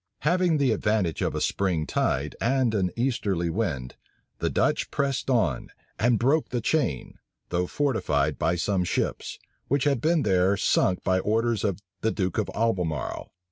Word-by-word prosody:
Having 175 Hz, 0 st, +2 dB
the 140 Hz, -4 st, +2 dB
advantage 105 Hz, -6 st, 0 dB
of -, -, -1 dB
a -, -, -1 dB
spring 90 Hz, -6 st, 0 dB
tide 70 Hz, 0 st, -1 dB
and 125 Hz, -1 st, +2 dB
an 95 Hz, -4 st, +1 dB
easterly 100 Hz, -9 st, 0 dB
wind, 80 Hz, -, -3 dB, 0.4 s
the -, -, 0 dB
Dutch -, -, +1 dB
pressed 140 Hz, -3 st, -1 dB
on, 95 Hz, -, +1 dB, 0.3 s
and 120 Hz, 0 st, +3 dB
broke 140 Hz, +7 st, +2 dB
the 125 Hz, -, -1 dB
chain, 120 Hz, -, -1 dB, 0.3 s
though 90 Hz, 0 st, 0 dB
fortified 75 Hz, -, 0 dB
by 80 Hz, +3 st, +1 dB
some 90 Hz, +1 st, 0 dB
ships, 90 Hz, -, -2 dB, 0.3 s
which 140 Hz, 0 st, +1 dB
had 140 Hz, -5 st, +1 dB
been 160 Hz, 0 st, +2 dB
there 95 Hz, 0 st, +2 dB
sunk 95 Hz, -1 st, +2 dB
by 95 Hz, -1 st, +2 dB
orders 110 Hz, +2 st, 0 dB
of 100 Hz, -1 st, -1 dB, 0.2 s
the 110 Hz, -, +2 dB
duke 95 Hz, -5 st, -1 dB
of -, -, -1 dB
Albemarle. 90 Hz, -, -1 dB
105 Hz, 160 wpm, -26 LUFS, 90-130 Hz, 0.4 s, and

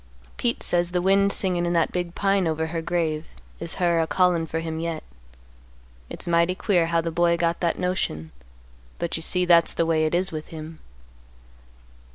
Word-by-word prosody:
Pete 235 Hz, 0 st, -1 dB
says 175 Hz, 0 st, +1 dB
the 180 Hz, 0 st, 0 dB
wind 195 Hz, +1 st, +4 dB
singin' 180 Hz, -3 st, 0 dB
in 175 Hz, 0 st, 0 dB
that 165 Hz, -1 st, +2 dB
big 175 Hz, -1 st, -3 dB
pine 195 Hz, -2 st, +1 dB
over 160 Hz, 0 st, -1 dB
her 165 Hz, -, -1 dB
grave 160 Hz, -2 st, -1 dB, 0.3 s
is 165 Hz, -, -3 dB
her 175 Hz, -2 st, +2 dB
a 160 Hz, -, -1 dB
callin' 175 Hz, -3 st, +2 dB
for 160 Hz, -, -3 dB
him 160 Hz, -1 st, -4 dB
yet. 165 Hz, -1 st, -3 dB, 1.1 s
It's -, -, -6 dB
mighty 170 Hz, +1 st, +2 dB
queer 180 Hz, -4 st, +1 dB
how 165 Hz, 0 st, +1 dB
the 165 Hz, 0 st, -3 dB
boy 170 Hz, +1 st, +2 dB
got 170 Hz, 0 st, 0 dB
that 170 Hz, -2 st, 0 dB
notion, 130 Hz, -, -2 dB, 0.7 s
but 170 Hz, -, -3 dB
you 160 Hz, -, -4 dB
see 180 Hz, +2 st, +1 dB
that's 170 Hz, -1 st, +5 dB
the 165 Hz, -, +1 dB
way 160 Hz, -1 st, +2 dB
it 155 Hz, -, -1 dB
is 185 Hz, +2 st, 0 dB
with 155 Hz, -1 st, -6 dB
him. 160 Hz, 0 st, -9 dB
170 Hz, 190 wpm, -24 LUFS, 165-180 Hz, 1.1 s, that's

